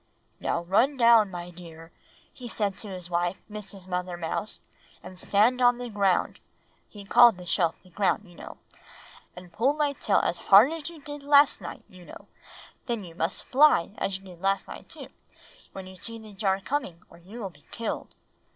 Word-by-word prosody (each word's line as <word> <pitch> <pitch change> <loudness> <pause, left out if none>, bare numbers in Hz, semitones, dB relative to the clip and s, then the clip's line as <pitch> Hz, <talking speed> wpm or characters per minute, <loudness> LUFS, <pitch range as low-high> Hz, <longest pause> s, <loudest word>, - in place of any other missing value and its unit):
"'Now 170 - -2
run 230 +11 +2
down, 230 -4 +6
my 175 -1 -7
dear,' 165 -1 -13 0.4
he 245 -2 -9
said 205 -3 -2
to 215 - -6
his 180 -2 -7
wife, 175 +2 0
Mrs. 200 -3 -9
Mother 180 -1 -3
Mouse, 175 +5 -4 0.4
'and 185 -1 -11
stand 225 +7 +2
on 245 0 +5
the 245 -1 -6
ground,' 200 -3 +1 0.5
he 205 -2 -12
called 230 0 +6
the 180 - -10
shelf 170 -1 +1
the 185 - -20
ground, 205 +2 0
you 175 - -16
know, - - -11 0.8
'and 180 -1 -12
pull 255 +9 +2
my 295 -2 0
tail 210 -6 +1
as 175 - 0
hard 210 +9 +6
as 325 -1 -5
you 325 -4 -14
did 290 0 -8
last 285 -4 +4
night, 170 - -8
you 185 -1 -15
know; - - -13 0.6
then 235 -4 -2
you 170 -2 -11
must 165 +2 -3
fly, 275 - +4
just 210 - -16
as 195 - -1
you 195 - -18
did 180 -2 -13
last 195 +1 0
night - - -11
too, - - -10 0.6
when 190 -1 -8
you 185 0 -12
see 230 +5 -7
the 220 -2 -13
jar 195 -1 0
coming, 195 - -4
or - - -16
you 195 +8 -11
will 195 -4 -5
be 145 -3 -24
killed. 230 -1 -5
195 Hz, 195 wpm, -26 LUFS, 180-235 Hz, 0.8 s, down